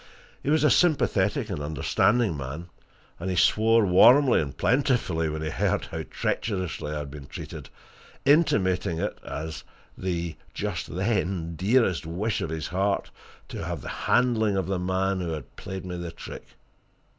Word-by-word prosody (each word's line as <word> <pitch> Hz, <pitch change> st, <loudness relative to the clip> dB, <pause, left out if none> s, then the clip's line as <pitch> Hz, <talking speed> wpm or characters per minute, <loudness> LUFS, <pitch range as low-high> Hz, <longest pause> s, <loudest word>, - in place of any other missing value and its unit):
He -, -, -3 dB
was 155 Hz, 0 st, +3 dB
a 150 Hz, -, +5 dB
sympathetic 115 Hz, -, +2 dB
and 85 Hz, -, -3 dB
an -, -, -4 dB
understanding 95 Hz, -, +2 dB
man, 70 Hz, +5 st, -6 dB, 0.5 s
and 90 Hz, +3 st, -3 dB
he 90 Hz, -, -1 dB
swore 110 Hz, +5 st, +4 dB
warmly 125 Hz, +8 st, +6 dB
and 70 Hz, -4 st, -5 dB
plentifully 120 Hz, -, +1 dB
when 80 Hz, 0 st, -4 dB
he 80 Hz, -, -2 dB
heard -, -, 0 dB
how -, -, -5 dB
treacherously 95 Hz, -7 st, -2 dB
I 75 Hz, -, -3 dB
had 75 Hz, -2 st, -5 dB
been 70 Hz, -2 st, -9 dB
treated, -, -, -8 dB, 0.6 s
intimating 100 Hz, -, +3 dB
it 100 Hz, +5 st, -3 dB
as 80 Hz, +1 st, -6 dB, 0.3 s
the 85 Hz, -3 st, -3 dB, 0.2 s
just -, -, -3 dB
then 95 Hz, -4 st, -1 dB
dearest 95 Hz, -3 st, +2 dB
wish 95 Hz, +5 st, -2 dB
of -, -, -2 dB
his 80 Hz, -1 st, -4 dB
heart 95 Hz, +2 st, 0 dB, 0.4 s
to -, -, -5 dB
have -, -, -4 dB
the -, -, -7 dB, 0.2 s
handling 110 Hz, -5 st, +3 dB
of 95 Hz, -, 0 dB
the 95 Hz, 0 st, -1 dB
man 95 Hz, +1 st, 0 dB
who 85 Hz, -2 st, -2 dB
had 75 Hz, -4 st, -8 dB
played 95 Hz, -1 st, -7 dB
me 90 Hz, -1 st, -5 dB
the 85 Hz, -1 st, -5 dB
trick. 85 Hz, -, -9 dB
95 Hz, 165 wpm, -26 LUFS, 80-110 Hz, 0.6 s, warmly